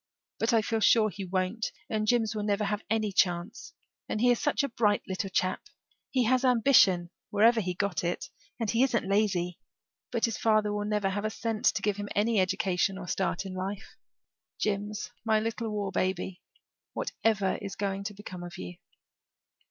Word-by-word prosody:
"But 225 - +2
I 225 -2 +3
feel 225 0 0
sure 215 +1 +5
he 195 - -6
won't 185 +4 -1 0.2
and 215 -1 -1
Jims 225 -1 +2
will 215 - -3
never 205 0 0
have 210 +1 -1
any 215 -2 +1
chance. 190 - 0 0.4
And - - -1
he 245 +2 +5
is 240 - +2
such 295 0 +1
a 280 - -1
bright 210 -3 +1
little 190 0 -3
chap 185 0 0 0.5
he 255 -2 +2
has 255 +3 +2
ambition, 230 -8 +4 0.2
wherever 225 +3 +4
he 180 -2 -3
got 185 -3 -1
it 175 +1 -3 0.3
and 225 - -1
he 230 - +2
isn't 245 -6 +2
lazy. 190 -4 +1 0.5
But 235 -2 +2
his 230 -2 -3
father 215 -2 +2
will 205 0 -2
never 210 -2 0
have 205 +2 -2
a 215 - 0
cent 225 +2 -3
to 200 - +3
give 205 -1 +1
him 205 0 -5
any 215 +1 +2
education 185 0 +1
or 180 -2 -7
start 190 +1 -1
in 190 - -6
life. 190 +2 -5 0.6
Jims, 205 0 -2
my 220 -1 +3
little 225 +1 -3
war 205 -2 -2
baby, 185 0 -2 0.5
whatever 210 -4 0
is 200 -1 -5
going 195 -1 -2
to 205 0 -5
become 185 -3 -8
of 175 +1 -8
you?" 180 -1 -7
205 Hz, 185 wpm, -29 LUFS, 190-225 Hz, 0.6 s, sure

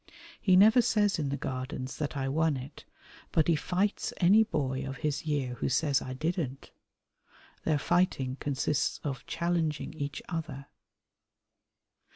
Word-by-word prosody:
He 185 -3 +4
never 220 +6 +7
says 210 -5 +2
in 145 -3 -1
the 140 - -2
Gardens 130 -1 -4
that 150 -1 -3
I 135 -1 -1
won 155 +1 +1
it, 130 +2 -10 0.5
but 160 - +2
he 170 - +4
fights 190 +6 -1
any 200 +5 +6
boy 135 -10 -2
of 135 0 -5
his 150 +1 -1
year 140 -5 -1
who - - 0
says 145 0 +2
I 130 - -5
didn't. 155 -2 -3 0.9
Their 155 -2 +2
fighting 140 -5 +1
consists 140 +1 -1
of 135 -4 -4
challenging 165 -3 -1
each 145 -2 -5
other. 155 -5 -5
150 Hz, 145 wpm, -30 LUFS, 135-175 Hz, 0.9 s, never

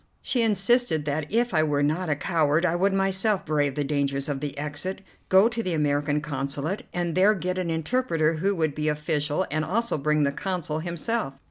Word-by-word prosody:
She 250 - 0
insisted 215 -5 +2
that 150 +1 -2
if 235 0 +1
I 155 - +4
were 145 -2 +1
not 160 +4 0
a 150 - +2
coward 160 0 +1
I 170 -1 +1
would 195 +3 +2
myself 195 +1 +1
brave 145 -3 0
the 145 - 0
dangers 140 -1 -1
of 145 -2 -2
the 145 0 -5
exit, 150 +7 -4 0.3
go 190 +3 +6
to 235 0 -2
the 185 -6 -2
American 145 0 +1
Consulate, 145 +5 -3
and 175 -1 -2
there 195 +5 +4
get 185 0 -2
an 180 -2 -2
interpreter 165 -2 0
who 195 +5 +1
would 160 -4 0
be 150 +1 -2
official, 150 +2 0
and 155 +1 0
also 225 +2 0
bring 150 +1 +2
the 140 - +2
Consul 165 -1 -3
himself. 170 0 -3
160 Hz, 200 wpm, -25 LUFS, 150-190 Hz, 0.3 s, go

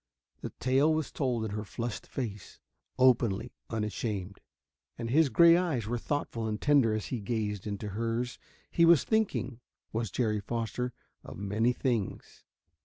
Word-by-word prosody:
The - - -5
tale 135 +5 +3
was 155 -2 -1
told 125 -5 -1
in 110 - -4
her 105 0 -3
flushed 115 +2 -5
face, 105 -7 -6 0.4
openly, 120 -3 +3 0.2
unashamed. 105 -3 -3 0.6
And 115 -1 -4
his 155 +1 +4
gray 170 +4 +7
eyes 165 - 0
were 120 +2 -2
thoughtful 115 -5 -2
and 105 -1 -2
tender 135 -7 +4
as 110 - -4
he 125 - -1
gazed 105 -2 -2
into 105 0 -4
hers. 115 +4 -2 0.3
He 170 - +3
was 170 -3 +7
thinking, 190 - 0 0.3
was 115 -1 -1
Jerry 105 +1 0
Foster, 115 +3 -3 0.3
of - - -9
many 105 +5 +1
things. 120 -6 -3
115 Hz, 150 wpm, -30 LUFS, 105-130 Hz, 0.6 s, gray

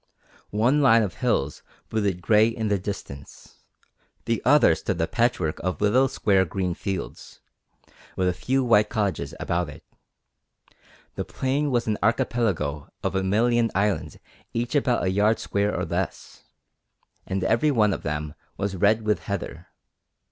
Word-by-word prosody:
One 120 +8 +2
line 115 -5 +5
of 95 -5 -3
hills 75 - -1 0.3
brooded 100 -5 -1
grey 110 +3 +5
in 115 -2 -2
the 100 -1 +1
distance, 70 -8 -8 0.7
the 115 -1 0
other 140 - +5
stood - - -3
a - - +2
patchwork 115 -10 0
of 90 -5 -3
little 125 +6 +3
square 100 -6 +2
green 90 0 -2
fields, 95 0 -6 0.8
with 95 - 0
a 90 - +2
few 130 +9 0
white 105 -4 +4
cottages 95 - -2
about 85 -2 -1
it. 75 - -12 1.3
The - - -3
plain 140 +3 -1
was 120 -3 +1
an 110 -1 -1
archipelago 100 -10 0
of - - -1
a 95 - +1
million 115 +4 +2
islands 100 +1 0 0.4
each 120 +1 -2
about 130 -4 +1
a 95 - +1
yard 105 +3 +3
square 100 +1 -1
or - - -1
less, - - -4 0.8
and 95 0 -2
everyone 115 -3 +3
of - - -4
them 75 -1 -3 0.2
was 100 -1 -2
red 105 +4 +2
with 105 -1 -1
heather. 100 0 -5
105 Hz, 150 wpm, -25 LUFS, 95-115 Hz, 1.3 s, line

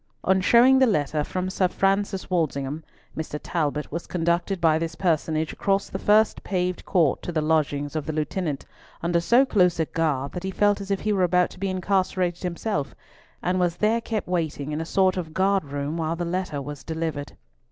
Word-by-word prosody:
On 190 0 +3
showing 245 +6 +6
the 260 - +5
letter 150 -6 0
from 185 +4 -3
Sir 185 0 +2
Francis 195 +1 0
Walsingham, 155 -4 -1 0.3
Mr. 155 -1 -4
Talbot 150 -3 -2
was 170 +3 -5
conducted 175 +2 0
by 160 -2 +3
this 165 0 -3
personage 160 -3 0
across 195 0 0
the - - -4
first 215 +1 +3
paved 180 -1 -1
court 165 -7 +2
to - - -5
the 160 - 0
lodgings 150 -2 0
of 155 -1 -3
the - - -1
Lieutenant 155 -1 -2 0.4
under 170 0 +2
so 235 +10 +4
close 180 -8 +2
a 160 - +2
guard 150 -4 -1
that 180 - -5
he 190 - -2
felt 205 +1 +2
as 195 - -7
if 195 -1 0
he 215 0 0
were 195 - +1
about 180 0 +3
to - - -13
be 195 0 -1
incarcerated 185 -1 0
himself, 170 -4 -3 0.5
and 180 +1 +1
was 175 -2 +1
there 220 +4 +1
kept 220 -2 -3
waiting 160 -5 -2
in 150 +1 -2
a - - -4
sort 185 +2 +2
of 160 -3 -5
guard 195 -2 +2
room 145 +3 -3
while 165 0 -1
the 175 +1 -3
letter 175 -4 -2
was 145 -1 -7
delivered. 160 -3 -4
175 Hz, 200 wpm, -25 LUFS, 155-190 Hz, 0.5 s, showing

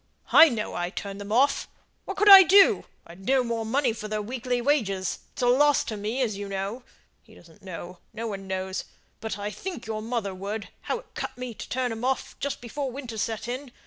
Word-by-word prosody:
"I 325 - +9
know 225 -5 -3
I 175 0 -2
turned 200 +1 -6
them 200 +1 -7
off 260 +6 +3 0.4
what 390 - -5
could 420 - +2
I 390 -1 +13
do? 390 +2 +6 0.2
I'd 175 +3 -13
no 260 +4 +3
more 230 -1 -2
money 245 +2 +1
for 220 -1 -7
their 215 0 -2
weekly 245 +3 -2
wages; 220 -9 0
it's - - -4
a - - +4
loss 285 +4 +4
to 220 - -5
me, 215 +6 -2
as 220 -4 -1
you 200 0 -6
know. 195 +5 -4 0.4
He - - -20
doesn't 165 -2 -18
know, 180 -1 -8
no 225 +1 -5
one 195 -3 -5
knows, 190 0 -3 0.3
but 220 -2 -4
I 205 +1 -4
think 345 - -6
your 220 -1 -4
mother 225 -3 -3
would, 200 +3 -5 0.2
how - - -1
it - - -15
cut - - -5
me 250 -1 -5
to - - -9
turn 250 -1 -1
'em 225 +1 -6
off 265 +1 -1
just 280 -2 -3
before 270 +3 -4
winter 245 -4 -7
set 225 +1 -3
in. 255 +2 -5
225 Hz, 220 wpm, -26 LUFS, 200-260 Hz, 0.4 s, I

